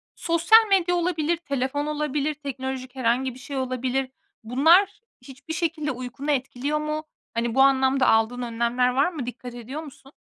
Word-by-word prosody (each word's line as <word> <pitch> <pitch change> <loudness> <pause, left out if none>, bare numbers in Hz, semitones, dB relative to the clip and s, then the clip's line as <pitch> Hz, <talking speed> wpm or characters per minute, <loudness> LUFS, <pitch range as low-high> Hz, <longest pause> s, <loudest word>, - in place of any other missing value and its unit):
sosyal 345 +7 +4
medya 360 -3 +3
olabilir, 340 -2 0
telefon 280 -2 -2
olabilir, 300 0 -1
teknolojik 265 -2 -6
herhangi 255 +1 0
bir 250 - -13
şey 275 +2 -6
olabilir. 255 0 -2 0.3
Bunlar 330 - +4 0.2
hiçbir 270 +5 -9
şekilde 320 -3 -2
uykunu 255 +3 -4
etkiliyor 275 +2 -1
mu? 305 0 -3 0.3
Hani, 230 0 -1
bu 265 - +5
anlamda 265 -1 +4
aldığın 225 +3 +2
önlemler 235 +1 0
var 270 +8 +1
mı? 290 -7 -5
Dikkat 245 0 -8
ediyor 250 +6 -7
musun? 275 -2 -14
270 Hz, 150 wpm, -24 LUFS, 250-305 Hz, 0.3 s, bu